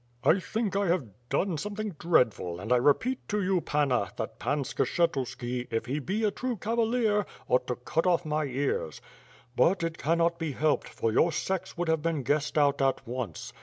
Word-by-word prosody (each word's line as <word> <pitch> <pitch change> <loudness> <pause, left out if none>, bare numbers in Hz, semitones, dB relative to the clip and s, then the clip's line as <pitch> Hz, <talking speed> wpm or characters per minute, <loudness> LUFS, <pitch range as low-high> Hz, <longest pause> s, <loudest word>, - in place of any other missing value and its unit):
"1 185 - +5
think 215 +1 -2
I 200 0 +1
have 170 -5 +1 0.2
done 180 -5 0
something 210 +4 -4
dreadful, 110 - +2
and 110 +6 0
I - - +5
repeat 225 - +2
to 210 - 0
you, 185 -1 +2
Panna, 135 -11 +1
that 110 -1 -5
Pan 145 -1 0
Skshetuski, 125 -5 -1
if 115 0 -1
he 135 +4 -2
be 195 +9 -2
a 210 - +3
true 250 +2 -3
cavalier, 225 0 +1 0.2
ought 125 - +2
to 125 - -1
cut 160 +8 -1
off 175 -1 +2
my 155 0 0
ears; 135 - -2 0.6
but 180 0 +3
it 165 0 -3
cannot 170 +2 +1
be 160 -4 -2
helped, 155 +2 +1
for 115 - -1
your 165 +9 +3
sex 190 +3 -3
would 175 0 -1
have 160 -1 +2
been 160 -3 -1
guessed 145 +4 0
out 145 -1 +3
at 135 -1 +1
once. 120 -9 -5
155 Hz, 190 wpm, -28 LUFS, 125-185 Hz, 0.6 s, 1